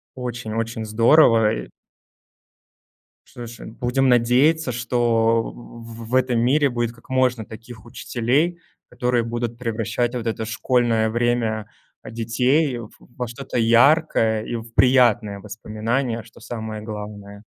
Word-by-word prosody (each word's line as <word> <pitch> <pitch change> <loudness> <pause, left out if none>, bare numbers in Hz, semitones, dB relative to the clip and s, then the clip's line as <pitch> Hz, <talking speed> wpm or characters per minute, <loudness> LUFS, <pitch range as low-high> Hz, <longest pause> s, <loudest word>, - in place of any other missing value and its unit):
Очень, 120 -3 -5
очень 115 0 -3
здорово, 115 0 +4
и - - -6 1.6
Слушай, 120 -1 -10
будем 125 +3 0
надеяться, 125 +5 +3
что 115 -1 +1
в 115 -1 -11
в 130 - 0
этом 125 -2 +2
мире 140 +4 +3
будет 120 -1 -2
как 115 +2 -21
можно 125 -4 +1
таких 115 +1 -12
учителей, 130 +8 -1 0.3
которые 125 -1 0
будут 120 0 -4
превращать 115 +1 -2
вот 120 -2 -4
это 110 0 -2
школьное 115 0 +1
время, 115 -2 0 0.3
а, - - -10
детей, 125 +5 +1
в 110 -2 -9
во 125 0 -7
что-то 120 +1 -6
яркое 115 -1 +3
и 120 - -5
в 115 0 -8
приятные 120 -5 +3
воспоминания, 115 +3 -3
что 115 - -18
самое 110 -2 -6
главное. 105 -1 -8
115 Hz, 125 wpm, -22 LUFS, 110-125 Hz, 1.6 s, здорово